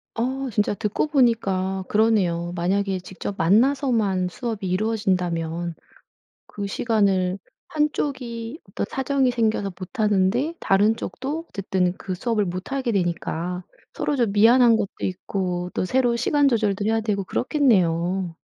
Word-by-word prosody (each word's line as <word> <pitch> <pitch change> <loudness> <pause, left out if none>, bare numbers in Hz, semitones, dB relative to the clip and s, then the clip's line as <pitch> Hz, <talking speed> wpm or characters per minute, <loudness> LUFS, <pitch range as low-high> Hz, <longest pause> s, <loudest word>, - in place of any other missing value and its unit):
어 260 +3 -2
진짜 205 -1 +1
듣고 210 +8 -1
보니까 195 -9 +1
그러네요. 190 -6 +2
만약에 190 +2 0
직접 190 +2 -6
만나서만 215 - +2
수업이 215 -1 -4
이루어진다면 180 -5 -1 0.7
그 200 -1 -6
시간을 195 -4 +1 0.3
한쪽이 270 -4 -2
어떤 - - -3
사정이 265 -1 +1
생겨서 220 -4 0
못 195 +6 -9
하는데 210 - +2
다른 205 +3 +3
쪽도 300 +9 -5
어쨌든 185 -2 0
그 190 - -5
수업을 210 +2 0
못 185 +6 -5
하게 270 -3 -1
되니까 180 -1 -2 0.3
서로 295 - -1
좀 235 -6 +1
미안한 230 +3 +6
것도 205 -3 -1
있고 180 -1 -3
또 - - -1
새로 245 +3 +2
시간 285 +4 +2
조절도 210 -5 +1
해야 225 +1 +1
되고 205 -3 -1
그렇겠네요. 185 - +1
205 Hz, 300 characters per minute, -23 LUFS, 185-240 Hz, 0.7 s, 미안한